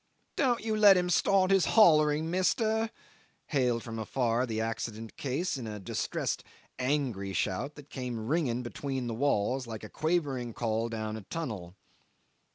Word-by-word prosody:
"Don't 245 Hz, -6 st, +1 dB
you 220 Hz, -1 st, 0 dB
let 205 Hz, -3 st, +7 dB
him 180 Hz, 0 st, +1 dB
start 190 Hz, +2 st, +3 dB
his 195 Hz, -2 st, +5 dB
hollering, 155 Hz, -5 st, +5 dB
mister," 220 Hz, +4 st, +1 dB, 0.6 s
hailed 125 Hz, -5 st, +1 dB
from 115 Hz, -1 st, -6 dB
afar 120 Hz, +2 st, 0 dB
the 110 Hz, -1 st, -2 dB
accident 110 Hz, 0 st, -4 dB
case 140 Hz, +5 st, -2 dB
in 120 Hz, -4 st, -6 dB
a 105 Hz, -1 st, -5 dB
distressed 95 Hz, -, -2 dB, 0.4 s
angry 125 Hz, -8 st, -1 dB
shout 105 Hz, -, -1 dB
that 145 Hz, -1 st, -13 dB
came 125 Hz, -4 st, -4 dB
ringing 130 Hz, -5 st, 0 dB
between 130 Hz, +1 st, -4 dB
the 120 Hz, -, -3 dB
walls 125 Hz, 0 st, 0 dB
like 110 Hz, -2 st, -6 dB
a -, -, -7 dB
quavering 145 Hz, -8 st, -1 dB
call 115 Hz, 0 st, -1 dB
down 110 Hz, -1 st, -4 dB
a -, -, -7 dB
tunnel. 100 Hz, -, -5 dB
130 Hz, 155 wpm, -30 LUFS, 115-165 Hz, 0.6 s, let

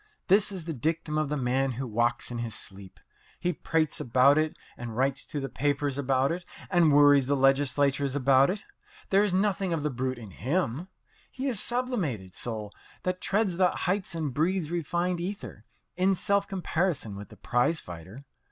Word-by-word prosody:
This 200 Hz, +2 st, +5 dB
is 185 Hz, -5 st, -6 dB
the 165 Hz, -, -3 dB
dictum 155 Hz, +2 st, -1 dB
of 155 Hz, -2 st, -1 dB
the 150 Hz, -, -1 dB
man 130 Hz, +1 st, 0 dB
who 130 Hz, +3 st, -4 dB
walks 120 Hz, +1 st, 0 dB
in 120 Hz, -, -4 dB
his 115 Hz, -2 st, -4 dB
sleep. 95 Hz, -1 st, -7 dB, 0.4 s
He 180 Hz, 0 st, 0 dB
prates 160 Hz, -1 st, 0 dB
about 130 Hz, +5 st, +4 dB
it, 155 Hz, 0 st, -1 dB, 0.2 s
and 115 Hz, -2 st, -7 dB
writes 135 Hz, +1 st, 0 dB
to 150 Hz, -, -4 dB
the 135 Hz, -, -3 dB
papers 145 Hz, +1 st, -1 dB
about 135 Hz, 0 st, +2 dB
it, 175 Hz, +1 st, -3 dB, 0.3 s
and 175 Hz, -4 st, +5 dB
worries 145 Hz, -2 st, +6 dB
the 140 Hz, -, +2 dB
legislators 140 Hz, 0 st, +2 dB
about 135 Hz, 0 st, +4 dB
it. 200 Hz, +2 st, -3 dB, 0.5 s
There 195 Hz, +1 st, +5 dB
is 210 Hz, -, +1 dB
nothing 190 Hz, -1 st, +1 dB
of 155 Hz, -3 st, -2 dB
the 150 Hz, -, 0 dB
brute 130 Hz, 0 st, -2 dB
about 110 Hz, -5 st, -10 dB
him. 155 Hz, +2 st, -1 dB, 0.4 s
He 260 Hz, -, -6 dB
is 250 Hz, -5 st, -1 dB
a -, -, 0 dB
sublimated 190 Hz, -, -2 dB
soul 110 Hz, -3 st, -4 dB, 0.3 s
that 185 Hz, 0 st, -2 dB
treads 200 Hz, -4 st, 0 dB
the 180 Hz, -1 st, +4 dB
heights 185 Hz, 0 st, -2 dB
and 155 Hz, -5 st, -2 dB
breathes 165 Hz, +2 st, 0 dB
refined 175 Hz, +1 st, -1 dB
ether 195 Hz, +4 st, -6 dB, 0.3 s
in 190 Hz, +1 st, +3 dB
self 200 Hz, +1 st, +2 dB
comparison 175 Hz, -, -1 dB
with 100 Hz, +1 st, -9 dB
the -, -, -14 dB
prize 135 Hz, +7 st, +1 dB
fighter. 90 Hz, -, -10 dB
145 Hz, 185 wpm, -28 LUFS, 130-180 Hz, 0.5 s, worries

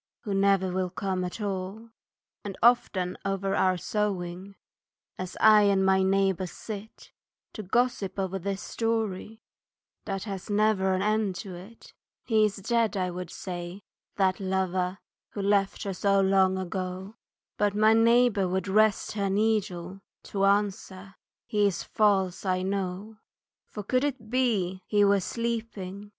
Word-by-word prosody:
Who 205 Hz, -, -4 dB
never 195 Hz, -1 st, +2 dB
will 185 Hz, 0 st, -1 dB
come 185 Hz, 0 st, -2 dB
at 180 Hz, +5 st, -5 dB
all. 200 Hz, +2 st, -4 dB, 0.5 s
And 200 Hz, -2 st, -6 dB
often 195 Hz, -6 st, +2 dB
over 195 Hz, 0 st, -1 dB
our 185 Hz, -1 st, +2 dB
sewing, 190 Hz, -1 st, -3 dB, 0.6 s
As 185 Hz, -1 st, -6 dB
I 215 Hz, -1 st, +7 dB
and 195 Hz, -1 st, +3 dB
my 190 Hz, 0 st, +4 dB
neighbour 190 Hz, -1 st, +1 dB
sit 215 Hz, +3 st, -9 dB, 0.4 s
To -, -, -6 dB
gossip 210 Hz, -2 st, 0 dB
over 195 Hz, 0 st, -2 dB
this 195 Hz, +1 st, -4 dB
story 225 Hz, -2 st, -3 dB, 0.6 s
That 195 Hz, -2 st, -3 dB
has 195 Hz, -3 st, -6 dB
never 205 Hz, -2 st, +2 dB
an 185 Hz, -, -1 dB
end 210 Hz, -2 st, +1 dB
to 190 Hz, -, -7 dB
it, 190 Hz, +6 st, -13 dB, 0.3 s
"He 220 Hz, -2 st, +3 dB
is 205 Hz, -2 st, -1 dB
dead," 225 Hz, +1 st, 0 dB
I 180 Hz, -1 st, -1 dB
would 180 Hz, -1 st, -6 dB
say, 180 Hz, +2 st, -7 dB, 0.3 s
"that 190 Hz, -2 st, +1 dB
lover, 185 Hz, -1 st, -1 dB, 0.4 s
Who 200 Hz, -, -4 dB
left 200 Hz, -1 st, +1 dB
her 195 Hz, -, -3 dB
so 195 Hz, +1 st, +2 dB
long 190 Hz, -1 st, +3 dB
ago," 185 Hz, +2 st, -5 dB, 0.4 s
But 205 Hz, -1 st, +1 dB
my 215 Hz, +1 st, +5 dB
neighbour 230 Hz, -3 st, +4 dB
would 190 Hz, +2 st, -2 dB
rest 215 Hz, +1 st, +2 dB
her 200 Hz, -2 st, -1 dB
needle 195 Hz, -3 st, -1 dB, 0.2 s
To 195 Hz, -1 st, -1 dB
answer, 195 Hz, -1 st, -1 dB, 0.3 s
"He's 205 Hz, -5 st, +1 dB
false 195 Hz, -4 st, +1 dB
I 185 Hz, -1 st, 0 dB
know." 195 Hz, +2 st, -3 dB, 0.5 s
"For 210 Hz, -, -7 dB
could 255 Hz, +6 st, +1 dB
it 260 Hz, -6 st, -3 dB
be 205 Hz, -8 st, 0 dB
he 205 Hz, -1 st, +3 dB
were 200 Hz, 0 st, +4 dB
sleeping. 210 Hz, -3 st, -4 dB
195 Hz, 145 wpm, -27 LUFS, 185-215 Hz, 0.6 s, I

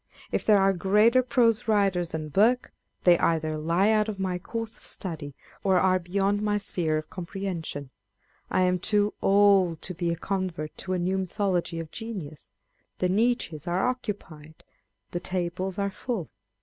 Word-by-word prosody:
If -, -, 0 dB
there 210 Hz, -2 st, +5 dB
are 195 Hz, 0 st, +4 dB
greater 210 Hz, +7 st, +4 dB
prose 240 Hz, -4 st, +2 dB
writers 195 Hz, -5 st, +2 dB
than 155 Hz, -2 st, -4 dB
Burke, 225 Hz, -, +2 dB, 0.3 s
they 175 Hz, -2 st, +6 dB
either 155 Hz, -1 st, +1 dB
lie 170 Hz, +7 st, +2 dB
out 215 Hz, 0 st, +2 dB
of 210 Hz, -, -4 dB
my 185 Hz, -2 st, -1 dB
course 225 Hz, +4 st, -5 dB
of -, -, -16 dB
study, 155 Hz, -7 st, -5 dB, 0.3 s
or 190 Hz, -2 st, +3 dB
are 185 Hz, 0 st, +3 dB
beyond 195 Hz, +3 st, 0 dB
my 210 Hz, -1 st, +1 dB
sphere 170 Hz, -6 st, -1 dB
of 155 Hz, -, -6 dB
comprehension. 170 Hz, -6 st, -5 dB, 0.6 s
I 185 Hz, -, +2 dB
am 180 Hz, 0 st, +2 dB
too 205 Hz, +2 st, +1 dB
old 195 Hz, -4 st, +4 dB
to 185 Hz, -, -2 dB
bo 175 Hz, 0 st, -3 dB
a 170 Hz, -, 0 dB
convert 180 Hz, -5 st, -3 dB
to 185 Hz, -, -2 dB
a -, -, +1 dB
new 185 Hz, +2 st, 0 dB
mythology 185 Hz, -3 st, -1 dB
of 165 Hz, -1 st, -7 dB
genius. 190 Hz, -10 st, -7 dB, 0.5 s
The 180 Hz, -, 0 dB
niches 195 Hz, -, 0 dB
are 180 Hz, +4 st, +1 dB
occupied, 195 Hz, -11 st, -6 dB, 0.5 s
the 175 Hz, -, -2 dB
tables 185 Hz, +1 st, -2 dB
are 200 Hz, 0 st, 0 dB
full. 205 Hz, -, -4 dB
185 Hz, 165 wpm, -27 LUFS, 170-205 Hz, 0.6 s, they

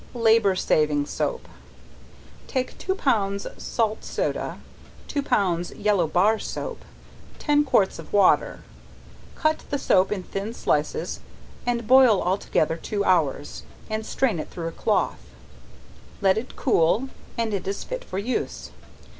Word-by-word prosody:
Labor 225 Hz, -4 st, +4 dB
saving 150 Hz, -5 st, +2 dB
Soap. 475 Hz, -, -3 dB, 1.0 s
Take 260 Hz, -2 st, -2 dB
two 380 Hz, -, -1 dB
pounds 200 Hz, -, 0 dB
salt 220 Hz, -2 st, -1 dB
soda, -, -, -2 dB, 0.5 s
two 285 Hz, -, -1 dB
pounds 180 Hz, -9 st, +1 dB
yellow 200 Hz, -5 st, +1 dB
bar 200 Hz, +7 st, +3 dB
soap, -, -, -5 dB, 0.6 s
ten 295 Hz, -1 st, +2 dB
quarts 205 Hz, -9 st, +2 dB
of -, -, -10 dB
water. 200 Hz, -2 st, +3 dB, 0.7 s
Cut 310 Hz, 0 st, +1 dB
the 285 Hz, -, 0 dB
soap 190 Hz, -8 st, +3 dB
in 195 Hz, -3 st, -2 dB
thin 200 Hz, +5 st, -5 dB
slices, 150 Hz, -8 st, -1 dB, 0.5 s
and 235 Hz, -1 st, 0 dB
boil 250 Hz, -4 st, +6 dB
all 185 Hz, +3 st, 0 dB
together 160 Hz, -3 st, 0 dB
two 200 Hz, +4 st, -2 dB
hours, 150 Hz, -5 st, +1 dB, 0.3 s
and 220 Hz, 0 st, -1 dB
strain 220 Hz, -5 st, 0 dB
it -, -, -5 dB
through 165 Hz, -1 st, -4 dB
a -, -, -9 dB
cloth, -, -, 0 dB, 1.0 s
let 190 Hz, -1 st, +4 dB
it 230 Hz, +4 st, -5 dB
cool 225 Hz, -, +2 dB, 0.3 s
and 230 Hz, -2 st, -1 dB
it 190 Hz, -2 st, -3 dB
is 195 Hz, +1 st, -3 dB
fit -, -, -5 dB
for -, -, -6 dB
use. 225 Hz, +6 st, -3 dB
205 Hz, 140 wpm, -24 LUFS, 185-245 Hz, 1.0 s, boil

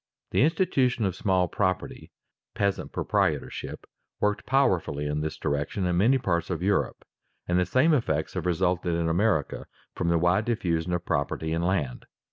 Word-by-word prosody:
_ -, -, -55 dB
The -, -, +2 dB
institution 140 Hz, -, +2 dB
of 95 Hz, -2 st, -1 dB
small 95 Hz, -2 st, +1 dB
property, 95 Hz, +1 st, -2 dB, 0.4 s
peasant 100 Hz, -2 st, -1 dB
proprietorship, -, -, -1 dB, 0.3 s
worked 105 Hz, 0 st, 0 dB
powerfully 90 Hz, -, +1 dB
in 75 Hz, +1 st, -1 dB
this 80 Hz, 0 st, -3 dB
direction 75 Hz, +6 st, -2 dB
in 90 Hz, -1 st, +1 dB
many 120 Hz, +8 st, +4 dB
parts 85 Hz, -8 st, -1 dB
of 90 Hz, -2 st, -3 dB
Europe, 100 Hz, +1 st, 0 dB, 0.4 s
and 90 Hz, +1 st, +2 dB
the 90 Hz, -, +1 dB
same 155 Hz, +6 st, +3 dB
effects 80 Hz, -, 0 dB
have -, -, -3 dB
resulted 90 Hz, 0 st, +1 dB
in 85 Hz, 0 st, 0 dB
America 85 Hz, -3 st, 0 dB, 0.3 s
from 85 Hz, -, -1 dB
the 85 Hz, -, +3 dB
wide 90 Hz, +6 st, +2 dB
diffusion 90 Hz, -7 st, -1 dB
of 90 Hz, 0 st, -2 dB
property 80 Hz, +3 st, -1 dB
in 85 Hz, -, 0 dB
land. 85 Hz, -8 st, -1 dB
90 Hz, 165 wpm, -27 LUFS, 80-105 Hz, 0.4 s, many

